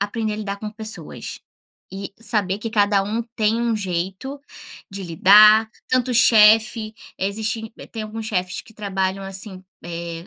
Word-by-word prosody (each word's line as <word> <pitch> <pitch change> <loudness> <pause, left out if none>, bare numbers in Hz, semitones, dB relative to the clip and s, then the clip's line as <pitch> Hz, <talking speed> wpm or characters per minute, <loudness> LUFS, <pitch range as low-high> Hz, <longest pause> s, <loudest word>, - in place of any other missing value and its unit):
aprender 215 +1 -2
a - - -4
lidar 200 -2 -4
com 210 0 -6
pessoas, 220 0 -7 0.5
e 195 0 -6
saber 205 -4 0
que 225 +1 -5
cada 205 -2 +2
um 220 +4 -2
tem 220 +1 +1
um 235 -2 0
jeito 190 +8 -4 0.5
de 195 0 -7
lidar, 210 +6 +6 0.2
tanto 255 -1 0
chefe, 220 -1 +5 0.2
existe 220 +3 -2
b - - -11
tem 225 - -7
alguns 220 +1 -6
chefes 185 -4 -2
que 220 - -18
trabalham, 195 -2 -2
assim, 190 0 -6 0.2
eh, 170 0 -6
210 Hz, 150 wpm, -21 LUFS, 195-220 Hz, 0.5 s, lidar